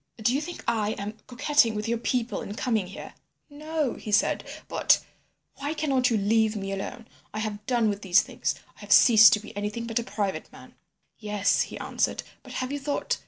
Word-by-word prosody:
Do 225 +2 +1
you 280 - +1
think 345 +3 -7
I 215 -2 +1
am 210 +2 -6
coquetting 245 -2 +2
with 210 +1 -3
your 235 0 0
people 245 0 -1
in 205 - -6
coming 220 -6 0
here?' 190 - -9 0.4
"'No,' 305 -2 -2
he 215 - -7
said. 205 - +2 0.2
'But—' - - +3 0.6
"'Why 290 +3 -3
cannot 270 -5 +1
you 230 - +2
leave 220 +2 +2
me 195 -1 -4
alone. 220 +4 -5 0.3
I - - -2
have 210 -1 -4
done 240 -3 +2
with 205 -1 -2
these 185 -1 +4
things. - - -2 0.2
I - - -22
have - - -10
ceased 220 -3 +8
to 210 - +2
be 215 - -12
anything 210 +3 -3
but 230 0 -1
a - - -3
private 200 -2 -3
man.' - - -14 0.5
"'Yes,' 210 -2 +1
he - - -7
answered. - - -1 0.2
'But - - -12
have 255 +1 -3
you 285 - -3
thought? 285 +1 -2
225 Hz, 205 wpm, -26 LUFS, 210-255 Hz, 0.6 s, ceased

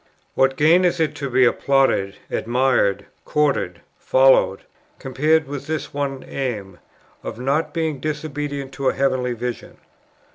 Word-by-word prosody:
What 135 0 +2
gain 165 +5 +5
is 175 -1 +1
it 160 -2 +1
to 140 -3 -4
be 130 0 +4
applauded, 125 -6 +2 0.2
admired, 120 -4 +1 0.2
courted, 150 -1 0 0.2
followed, - - +4 0.4
compared 150 +4 +1
with 140 0 -7
this 155 -2 -4
one 140 -2 -3
aim, 105 -9 -5 0.4
of - - -6
not 140 +5 0
being 160 -4 -2
disobedient 145 -2 -4
to 135 -1 0
a - - -1
heavenly 130 -2 0
vision? 120 0 -6
140 Hz, 135 wpm, -21 LUFS, 130-155 Hz, 0.4 s, gain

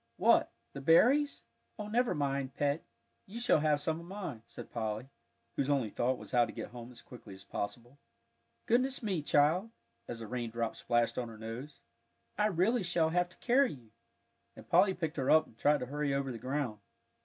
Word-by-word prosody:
"What - - +4 0.2
the 140 - -6
berries? 255 - +4 0.3
Oh, 210 -2 -5
never 240 +3 +1
mind, 140 -2 -1
Pet, 145 +2 0 0.4
you 215 +5 -7
shall 240 -9 +4
have 150 -1 +2
some 160 +2 -1
of 170 - -11
mine," 180 - -6
said 115 - -10
Polly, 110 +1 -3 0.5
whose 140 0 0
only 135 -7 +1
thought 130 +2 0
was - - -11
how 120 -1 +5
to 115 - -3
get - - -6
home 120 0 -9
as 120 - -13
quickly 115 -5 -11
as 95 - -13
possible. 120 +7 -6 0.7
"Goodness 255 +3 +1
me, 190 -7 0
child!" 155 +8 +3 0.4
as 120 - -5
a 115 - -6
raindrop 115 -1 -3
splashed 120 +1 +1
on 120 -2 -3
her 110 - -10
nose. 115 +6 -7 0.5
"I 210 +1 +2
really 210 +5 +2
shall 170 -3 +1
have 175 +1 +1
to - - -21
carry 260 +2 +3
you," 120 -6 -15 0.6
and - - -13
Polly 190 -2 +4
picked 160 -3 -3
her 135 -2 0
up, 155 0 +6
and - - -20
tried 145 +5 +3
to - - -2
hurry 145 +1 -1
over 135 -1 -1
the 115 - -6
ground. 130 -4 -2
145 Hz, 195 wpm, -32 LUFS, 120-180 Hz, 0.7 s, up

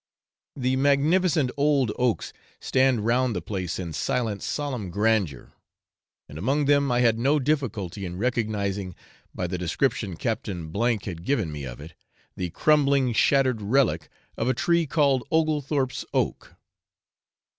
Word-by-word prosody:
The 130 -1 0
magnificent 145 +2 +2
old 140 -5 +2
oaks 125 -3 -1 0.3
stand 130 -5 +2
round 120 0 +2
the - - -1
place 90 -2 -3
in 85 -4 -5
silent 115 -5 -1
solemn 130 -10 -3
grandeur; 100 - 0 0.7
and 75 - -9
among 140 - +1
them 140 -1 +3
I 120 0 +2
had 115 -2 +3
no 140 +5 +3
difficulty 125 - -2
in 90 -1 -5
recognising, 100 -5 -2 0.4
by 90 - -2
the 90 0 -3
description 95 - -1
Captain 95 -7 -3
F 115 -1 +1
had 85 -3 -6
given 110 - 0
me 75 -2 -6
of - - -8
it, 80 +3 -10 0.4
the 90 - -3
crumbling 140 - +3
shattered 130 0 +3
relic 100 - +1 0.3
of 115 - -1
a 130 - +1
tree 170 +3 +1
called 140 -3 +2
Oglethorpe's 150 -4 0
oak. - - -1
120 Hz, 140 wpm, -25 LUFS, 95-140 Hz, 0.7 s, them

